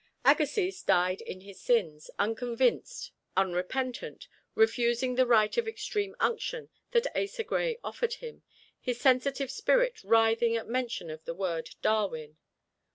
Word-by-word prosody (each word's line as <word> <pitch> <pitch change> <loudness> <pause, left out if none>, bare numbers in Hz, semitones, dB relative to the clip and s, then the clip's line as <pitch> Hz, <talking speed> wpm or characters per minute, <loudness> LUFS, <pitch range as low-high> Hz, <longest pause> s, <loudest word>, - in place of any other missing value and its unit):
Agassiz 365 +5 +3
died 180 +1 +2
in 185 - -8
his 195 0 -13
sins, 170 -11 0
unconvinced 235 - 0 0.3
unrepentant, 195 - -2 0.3
refusing 250 - +2
the 255 0 +3
rite 215 -3 +4
of 470 -1 +1
extreme 415 -2 -3
unction 470 +1 -1 0.2
that 470 0 +2
Asa 400 +3 -1
Gray 475 +1 -1
offered 475 -1 -2
him, 475 -2 -10 0.4
his 245 -2 -3
sensitive 270 0 +2
spirit - - +1
writhing 225 +1 +3
at 225 - -5
mention 235 -8 -2
of 155 0 -9
the 165 - -4
word 170 -4 -3
"Darwin." 160 -8 0
245 Hz, 130 wpm, -29 LUFS, -, 0.4 s, rite